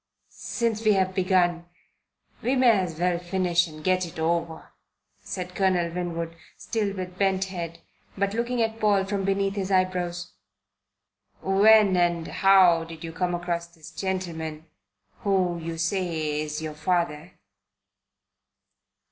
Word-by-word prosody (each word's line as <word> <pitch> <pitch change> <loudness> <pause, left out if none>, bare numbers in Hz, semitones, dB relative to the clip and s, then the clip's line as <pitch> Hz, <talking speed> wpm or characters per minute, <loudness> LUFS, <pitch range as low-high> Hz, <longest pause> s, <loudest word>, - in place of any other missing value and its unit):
"Since 230 -2 -2
we've 190 -3 +3
begun, 180 -2 +2 0.8
we 255 +3 +1
may 255 -2 +6
as 185 -7 0
well 175 0 +1
finish 175 -1 +1
and 155 -1 -11
get 185 +1 +2
it 170 -2 -7
over," 165 0 -2 0.5
said 180 -1 -6
Colonel 180 -3 +1
Winwood, 170 -2 -4 0.2
still 210 -4 -2
with 185 -1 -6
bent 195 -1 +2
head, 170 -3 -6 0.4
but 200 +1 0
looking 235 +1 0
at 225 0 -3
Paul 205 -3 +3
from 195 0 -2
beneath 195 0 +1
his 195 -2 -2
eyebrows. 180 -2 0 1.1
"When 205 0 +5
and 175 -2 +1
how 185 -4 +5
did 165 0 -10
you 165 -1 -6
come 175 +1 -1
across 175 -1 -3
this 165 -1 -14
gentleman 165 -5 -4 0.5
who 185 -4 +1
you 165 0 -5
say 165 -3 -1
is 155 +1 -4
your 155 -1 -4
father?" 170 0 -1
180 Hz, 130 wpm, -26 LUFS, 170-195 Hz, 1.1 s, may